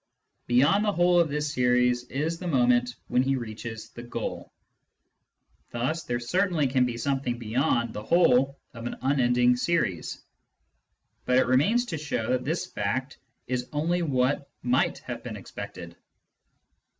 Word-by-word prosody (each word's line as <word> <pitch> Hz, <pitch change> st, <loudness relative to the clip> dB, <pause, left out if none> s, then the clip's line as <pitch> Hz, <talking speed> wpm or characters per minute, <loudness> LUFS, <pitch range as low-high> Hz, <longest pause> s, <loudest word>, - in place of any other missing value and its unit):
Beyond 145 Hz, +12 st, +4 dB
the 210 Hz, -, +2 dB
whole 175 Hz, -1 st, +4 dB
of 170 Hz, -2 st, +3 dB
this 150 Hz, +1 st, -2 dB
series 125 Hz, 0 st, +2 dB
is 155 Hz, +6 st, -2 dB
the 180 Hz, -, -5 dB
moment 125 Hz, -4 st, +2 dB
when 125 Hz, +1 st, +2 dB
he 135 Hz, +1 st, +1 dB
reaches 110 Hz, -2 st, -6 dB
the 120 Hz, -, -9 dB
goal. 120 Hz, -, -5 dB, 1.2 s
Thus 130 Hz, +8 st, -2 dB
there 120 Hz, 0 st, -1 dB
certainly 170 Hz, +5 st, +1 dB
can 130 Hz, -1 st, +2 dB
be 120 Hz, -1 st, -4 dB
something 130 Hz, -1 st, -1 dB
beyond 120 Hz, 0 st, 0 dB
the 105 Hz, -, -5 dB
whole 135 Hz, -1 st, +3 dB, 0.2 s
of 115 Hz, 0 st, -6 dB
an -, -, -5 dB
unending 125 Hz, -2 st, +3 dB
series. 125 Hz, -, -1 dB, 1.0 s
But 125 Hz, -, +3 dB
it 130 Hz, -, +4 dB
remains 180 Hz, -, +3 dB
to 165 Hz, -9 st, -4 dB
show 125 Hz, -6 st, -2 dB
that 125 Hz, 0 st, +1 dB
this 160 Hz, +4 st, -1 dB
fact 130 Hz, +7 st, -3 dB, 0.3 s
is 125 Hz, 0 st, -3 dB
only 170 Hz, +4 st, 0 dB
what 140 Hz, -2 st, 0 dB
might 125 Hz, +1 st, +2 dB
have -, -, -5 dB
been -, -, -6 dB
expected. -, -, -9 dB
130 Hz, 150 wpm, -27 LUFS, 120-150 Hz, 1.2 s, Beyond